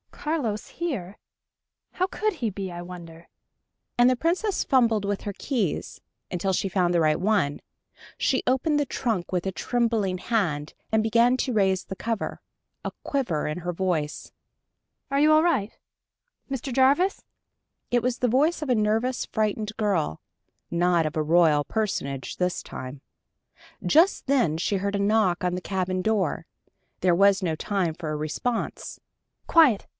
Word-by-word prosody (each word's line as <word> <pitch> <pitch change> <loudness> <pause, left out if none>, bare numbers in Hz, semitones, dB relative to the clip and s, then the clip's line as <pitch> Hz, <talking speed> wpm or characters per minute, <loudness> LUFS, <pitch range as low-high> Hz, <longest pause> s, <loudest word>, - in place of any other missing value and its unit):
"Carlos 260 -10 -3
here? 215 - -4 0.8
How 370 - +1
could 430 +3 -1
he 235 -9 -2
be, 195 -1 -5
I 175 0 -6
wonder?" 170 -2 -10 0.7
and 240 0 +6
the 255 - +4
Princess 360 - 0
fumbled 230 -5 +3
with 200 0 -2
her 205 - -4
keys, 220 - -2 0.3
until 190 +2 -1
she 195 - 0
found 180 -1 +1
the 170 - +3
right 155 -1 +2
one. 185 -7 +1 0.6
She 260 - +1
opened 295 +4 +2
the 290 - +1
trunk 225 -9 -2
with 180 0 -1
a - - 0
trembling 220 -3 0
hand, 170 -10 -1 0.2
and 220 0 +3
began 235 +3 +3
to 255 0 -1
raise 190 -3 +2
the 190 - -6
cover, 225 +2 -3 0.5
a - - -2
quiver 235 - -1
in 150 +3 -3
her 175 0 -3
voice. 165 -5 -2 0.8
"Are 275 +1 +1
you 305 +1 +5
all 310 0 +6
right... 270 - 0 0.8
Mr. 270 0 -3
Jarvis?" 275 +10 +3 0.7
It 240 -1 +1
was 250 0 -1
the 250 - +2
voice 295 +8 +2
of 300 - -4
a 250 - +4
nervous, 220 +4 0
frightened 215 0 -1
girl 195 - 0 0.5
not 170 -1 +2
of 155 - -6
a 155 - +1
royal 155 -2 +4
personage 140 - -3
this 180 -1 -1
time. 130 +2 -8 0.8
Just 330 +3 +3
then 245 - +2
she 195 +4 0
heard 200 +1 -2
a - - -1
knock 200 -3 +2
on 180 0 0
the 180 - -4
cabin 185 -1 -2
door. 205 -7 0 0.6
There 180 -1 +4
was 200 +2 +4
no 165 -4 0
time 180 -1 -1
for 160 -3 -5
a - - -2
response. 155 +10 -3 0.5
"Quiet! 295 -11 +5
205 Hz, 160 wpm, -25 LUFS, 175-250 Hz, 0.8 s, and